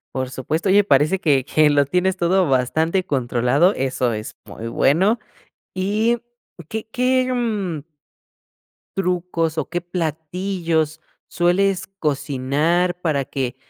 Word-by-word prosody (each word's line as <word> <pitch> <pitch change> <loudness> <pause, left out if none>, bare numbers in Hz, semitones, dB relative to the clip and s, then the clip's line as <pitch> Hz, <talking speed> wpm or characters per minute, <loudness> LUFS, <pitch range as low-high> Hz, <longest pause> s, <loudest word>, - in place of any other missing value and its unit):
Por 130 -1 -2
supuesto, 155 +8 -2
oye, 200 +2 +5
parece 190 -1 +3
que 140 -5 +2
que 155 +1 +3
lo 145 -1 +3
tienes 180 +6 0
todo 180 -2 +2
bastante 160 +8 +1
controlado, 130 - +2
eso 130 -2 -1
es 110 0 -5
muy 115 - -8
bueno. 185 - +2 0.6
Y 210 +5 +1 0.5
qué 220 +3 -5
qué, 255 +1 +1
mm 205 - -2 1.1
trucos 175 -3 -1
o 155 - -2
qué 175 - -1
platillos 165 -1 -2 0.3
sueles 185 +2 +1
cocinar 150 +5 0
para 155 -5 0
que, 130 -2 -3
165 Hz, 120 wpm, -21 LUFS, 140-190 Hz, 1.1 s, oye